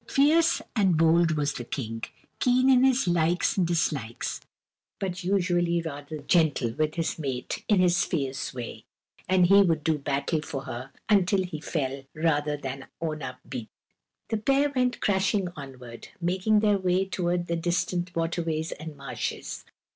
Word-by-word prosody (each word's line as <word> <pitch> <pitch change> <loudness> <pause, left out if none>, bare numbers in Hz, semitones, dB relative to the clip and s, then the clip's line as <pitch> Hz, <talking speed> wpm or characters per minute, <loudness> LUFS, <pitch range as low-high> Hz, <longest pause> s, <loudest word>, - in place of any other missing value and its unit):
Fierce 320 +4 +3
and 190 -7 +3
bold 165 +1 +4
was 145 -1 0
the 120 - -5
King, 115 -2 -5 0.4
keen 255 +1 +4
in 255 -1 +5
his 265 -4 +3
likes 175 0 +2
and 185 -3 +2
dislikes, 150 -9 -1 0.6
but 185 -1 -3
usually 175 -2 +1
rather 155 -1 -6
gentle 150 -8 +2
with 155 +5 -1
his 165 -1 -2
mate 130 -4 -4
in 205 -3 +4
his 175 -1 +4
fierce 135 -5 -2
way, 125 -3 -7 0.5
and 185 -1 +5
he 200 +3 +7
would 165 -5 +2
do 155 -1 +1
battle 140 +3 -1
for 135 -3 -5
her 125 +1 -7 0.2
until 195 -2 +3
he 170 -4 -6
fell 135 -4 -2
rather 150 -2 +1
than 135 -1 -6
own 155 -2 -3
up 130 -1 -6
beaten. 115 -3 -6 0.6
The 220 - 0
pair 275 +6 +2
went 250 -1 +1
crashing 190 -1 +1
onward, 130 -4 -10
making 190 +5 +2
their 205 -2 +3
way 185 +1 +1
toward 175 -2 -1
the 170 - -1
distant 175 +1 -1
waterways 165 -1 -1
and 155 0 -8
marshes. 140 0 -5
170 Hz, 155 wpm, -27 LUFS, 145-190 Hz, 0.6 s, he